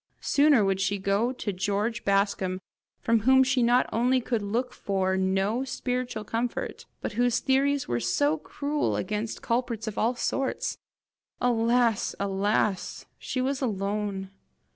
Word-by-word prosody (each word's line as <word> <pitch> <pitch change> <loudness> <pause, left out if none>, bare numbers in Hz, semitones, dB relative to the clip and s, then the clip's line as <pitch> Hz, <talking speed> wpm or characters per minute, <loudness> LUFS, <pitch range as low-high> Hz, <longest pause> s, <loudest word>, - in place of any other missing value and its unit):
Sooner 285 -7 +4
would 195 -1 +1
she 200 +1 +1
go 200 +5 +1
to 230 -5 -4
George 205 +4 -1
Bascombe 195 -2 +1 0.4
from 230 0 +3
whom 265 +4 +5
she 260 -1 +1
not 240 +2 +4
only 250 +3 +3
could 235 -2 -1
look 235 +5 -2
for 190 -1 -1
no 195 +5 +1
spiritual 250 -4 -3
comfort, 230 +3 -3
but - - -3
whose 240 +2 +2
theories 275 +1 +1
were 120 - 0
so 145 +6 +1
cruel 290 - -2
against 215 +1 -3
culprits 235 -2 -1
of 220 -2 -4
all 235 +3 +1
sorts! 270 +2 -2 0.6
Alas, 235 -2 +2
alas! 200 0 0
she 255 - -3
was 270 +1 -1
alone! 200 -3 -2
225 Hz, 140 wpm, -27 LUFS, 200-250 Hz, 0.6 s, whom